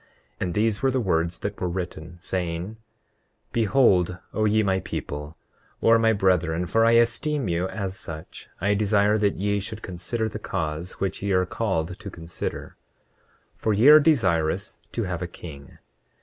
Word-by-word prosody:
And 90 - -2
these 105 -1 +1
were 135 - +3
the 130 0 +1
words 85 -5 0
that 100 +4 -5
were 90 - 0
written, 85 -2 -6
saying: 85 -2 -2
29:5 110 +4 -9 0.7
Behold, 100 -6 +3 0.2
O 110 - +1
ye 110 +1 +3
my 95 -1 +1
people, 75 -2 -6 0.4
or 115 0 +5
my 115 0 +4
brethren, 90 -4 +1
for 115 +5 +2
I 115 0 +5
esteem 125 +3 +2
you 85 +1 0
as 95 -1 -5
such, 80 -1 -9
I 100 +3 +2
desire 105 +1 +3
that 100 -1 +2
ye 100 +1 0
should 110 +2 -6
consider 110 +5 -3
the 110 0 -6
cause 85 -3 -3
which 95 - -3
ye 100 0 -1
are 90 0 +3
called 90 -4 -2
to 105 -2 -7
consider—for 85 +5 -7
ye 110 +8 +6
are 155 0 +10
desirous 100 - +1
to 115 - -1
have 90 -3 -3
a 90 - -2
king. 75 -5 -11
95 Hz, 165 wpm, -25 LUFS, 85-110 Hz, 0.7 s, are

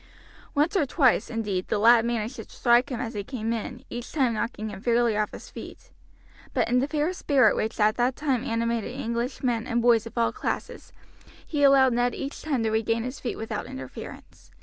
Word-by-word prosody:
Once 300 +7 +2
or 300 -7 +2
twice, 260 -3 +3
indeed, 205 -5 -2
the - - 0
lad 230 +2 +6
managed 235 +1 -2
to - - -6
strike 240 0 +3
him 245 - -3
as 240 -1 -4
he 205 -2 -3
came 230 -1 -3
in, 240 +2 -5
each 240 0 -7
time 260 -6 +1
knocking 220 0 -3
him 195 -2 -8
fairly 235 -1 +2
off 210 0 0
his - - -10
feet; - - -10 0.6
but - - +2
in 250 +1 +3
the 270 - 0
fair 305 +3 0
spirit 285 -7 +3
which 220 +1 -2
at 215 0 +3
that 250 +1 +1
time 270 -5 0
animated 230 -2 -1
English 235 +4 -3
men 240 -2 0
and 240 -1 +1
boys 230 -1 +3
of 230 - -12
all 230 - +2
classes - - -4 0.5
he 295 -3 -2
allowed 270 -2 +6
Ned 245 +1 +1
each 275 +1 -5
time 275 -7 -1
to 220 - 0
regain 225 +1 0
his 255 +2 -5
feet 245 - -3
without 220 +2 -4
interference. 265 +1 -10
240 Hz, 205 wpm, -26 LUFS, 225-260 Hz, 0.6 s, lad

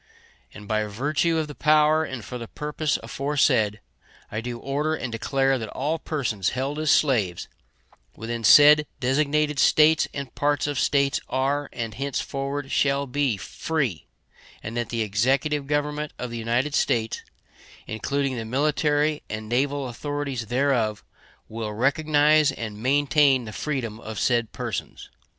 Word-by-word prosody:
And 105 -1 -12
by 110 0 0
virtue 145 +10 0
of 155 -1 -1
the 145 - -8
power 155 +1 +3
and 130 -8 -6
for 125 - -6
the 115 - -7
purpose 150 +2 -2
aforesaid, 115 -7 +1 0.5
I 110 - -3
do 120 0 -5
order 145 +5 -1
and 130 -5 -5
declare 135 +3 0
that 110 -2 -5
all 150 +8 -2
persons 120 - -2
held 140 +3 -2
as 155 -1 0
slaves 110 - +2 0.7
within 115 +1 -5
said 150 +4 +7
designated 150 +2 +1
States 155 +2 +5
and 140 -2 -6
parts 145 -1 0
of 145 -3 -2
States 140 -1 +2
are, 135 +3 0
and 115 -2 -5
henceforward 140 0 -3
shall 140 0 +1
be, 135 -4 0
free; 130 - -3 0.6
and 110 +2 -6
that 120 -1 -2
the 115 -1 -1
Executive 135 +8 0
Government 150 +1 -2
of 125 -1 -5
the 120 - -5
United 120 +6 0
States, 115 -5 0 0.6
including 135 +4 -2
the 115 - -3
military 150 +4 +1
and 110 0 -5
naval 135 +3 0
authorities 140 -1 -4
thereof, 120 -4 0 0.4
will 110 -1 -5
recognize 150 +4 +3
and 110 -5 -7
maintain 135 0 +3
the 110 - -8
freedom 120 -7 -3
of 110 -1 -8
said 120 0 +1
persons. - - -5
135 Hz, 145 wpm, -24 LUFS, 115-145 Hz, 0.7 s, said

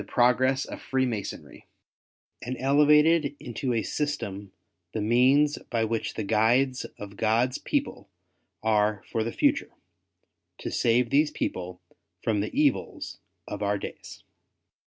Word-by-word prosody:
progress 130 +2 +3
of - - -8
Freemasonry, 125 -6 -3 0.8
and 125 +1 -4
elevated 150 +2 +4
into 125 -1 -3
a 115 -2 0
system 100 -11 -3 0.4
the 110 - -2
means 130 +7 +3
by 115 -3 0
which 115 0 -2
the 110 - -2
guides 120 +5 +2
of 100 -1 -9
God's 115 +4 +1
people 275 - -3 0.5
are 105 -2 +2
for 115 -2 0
the 115 - -3
future, - - +1 0.9
to - - -5
save 120 +1 +2
these 150 +2 +4
people 90 -7 -4 0.4
from 110 -2 +1
the 105 - -3
evils 145 -4 0 0.3
of 105 - -6
our 100 0 +1
days. - - -9
120 Hz, 125 wpm, -27 LUFS, 105-135 Hz, 0.9 s, elevated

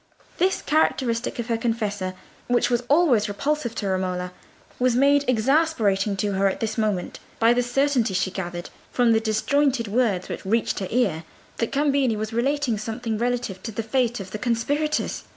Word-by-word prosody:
This 375 +2 +1
characteristic 255 -6 +1
of 235 - -3
her 230 -2 0
confessor, 210 -5 -2 0.3
which 245 0 +2
was 240 0 +2
always 280 -9 +4
repulsive 250 +2 -2
to 205 - -3
Romola, 185 -1 -2 0.5
was 250 -1 +2
made 280 +2 +4
exasperating 225 -6 +2
to 205 +1 0
her 195 0 +2
at 190 - -2
this 220 -1 -2
moment 210 -6 -1 0.2
by 230 +1 +4
the 245 - +2
certainty 245 -4 +1
she 190 0 0
gathered, 175 -2 -5 0.2
from 245 -2 +3
the 225 - +4
disjointed 240 +3 +1
words 205 -4 +1
which - - -6
reached 225 +4 0
her 190 - -3
ear, 200 -10 +1 0.3
that 230 - -1
Cambini 275 -4 +2
was 215 +1 -4
narrating 255 -1 0
something 225 0 -3
relative 240 -6 -2
to 225 - -5
the 225 +2 -3
fate 240 0 0
of 195 -1 -8
the 215 - -5
conspirators. 285 +7 -1
230 Hz, 170 wpm, -24 LUFS, 205-255 Hz, 0.5 s, always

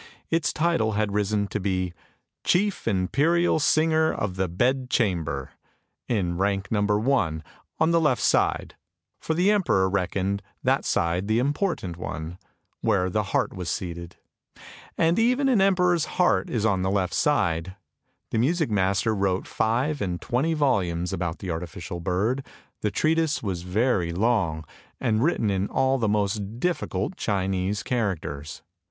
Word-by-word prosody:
Its 165 -1 +2
title 155 -10 +1
had 105 -1 0
risen 105 0 +1
to 105 - -3
be 95 -2 -1 0.3
" - - -55
Chief 200 - +1
Imperial 145 - +2
Singer 160 +1 +3
of 95 -3 -3
the 95 0 0
Bed 125 +9 0
Chamber, 85 - -1 0.3
" - - -51
in 90 -6 -1
rank 100 0 0
number 105 -1 +2
one, 105 - 0 0.3
on 160 +1 +3
the 165 0 +3
left 150 -6 +2
side; - - +1 0.4
for 160 - -2
the 180 +5 +3
emperor 175 - +2
reckoned 100 +1 -1 0.2
that - - +2
side 85 +3 0
the 110 +1 +2
important 140 - -1
one, 85 0 -6 0.4
where 90 0 +1
the 105 +1 0
heart - - 0
was 90 -2 -5
seated. 85 -1 -5 0.8
And 165 +5 +3
even 250 +4 +3
an 245 -7 +3
emperor's 180 -4 +3
heart 175 - +2
is 110 -3 -1
on 95 -4 +2
the 95 - 0
left 95 -2 0
side. 95 - +1 0.6
The 110 - +1
music 155 +1 +1
master 100 +2 +1
wrote 95 -2 0
five 125 +7 0
and 90 -3 -2
twenty 140 +7 0
volumes 90 - 0
about 85 -2 -2
the 95 - -5
artificial 85 +1 -5
bird; 100 +10 0 0.4
the 105 - +1
treatise 160 +4 +1
was 95 -5 -2
very 90 -1 0
long, 90 -6 0 0.3
and 110 -4 +1
written 125 -8 +1
in 95 +1 0
all 135 0 +1
the 110 -3 +1
most 105 +1 -1
difficult 175 +3 -2
Chinese 95 0 -1
characters. 80 - -3
105 Hz, 150 wpm, -25 LUFS, 90-140 Hz, 0.8 s, Singer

